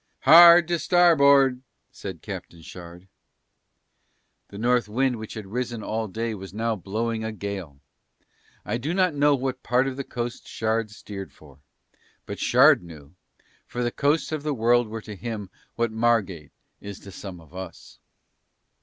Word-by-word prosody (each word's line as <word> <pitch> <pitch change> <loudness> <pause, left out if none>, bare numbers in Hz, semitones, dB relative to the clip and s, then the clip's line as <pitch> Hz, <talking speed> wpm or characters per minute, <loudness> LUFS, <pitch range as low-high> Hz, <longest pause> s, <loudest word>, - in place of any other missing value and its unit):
"Hard 170 +3 +8
to 170 -1 0
starboard," 140 -8 +4 0.3
said - - -9
Captain 85 -1 -8
Shard. 90 +2 -12 1.4
The 100 - -11
North 120 0 +1
wind 125 +2 0
which 110 -1 -8
had 110 -2 -7
risen 120 +2 -4
all 110 0 -3
day 115 +3 -3
was 95 -1 -9
now 115 +1 -1
blowing 110 +4 -3
a 110 - -3
gale. 100 -8 -6 0.9
I - - -2
do 155 +8 -3
not 185 -3 +2
know 145 0 +3
what 130 -1 -4
part 125 +2 +1
of 135 -1 -4
the 140 - -3
coast 120 -2 -6
Shard 110 0 -1
steered 100 -2 -9
for, 70 -3 -19 0.7
but - - -7
Shard - - +5
knew, 80 -4 -13 0.5
for 125 - -4
the 120 - -1
coasts 145 +6 0
of 155 -2 -3
the 150 -1 -2
world 120 0 +2
were 110 +1 -6
to 105 -1 -9
him 105 -2 -6 0.2
what 115 -1 -1
Margate 110 -9 0 0.3
is 100 -1 -8
to 100 - -11
some 95 -2 -9
of 80 -1 -19
us. 95 0 -10
115 Hz, 160 wpm, -24 LUFS, 100-130 Hz, 1.4 s, Hard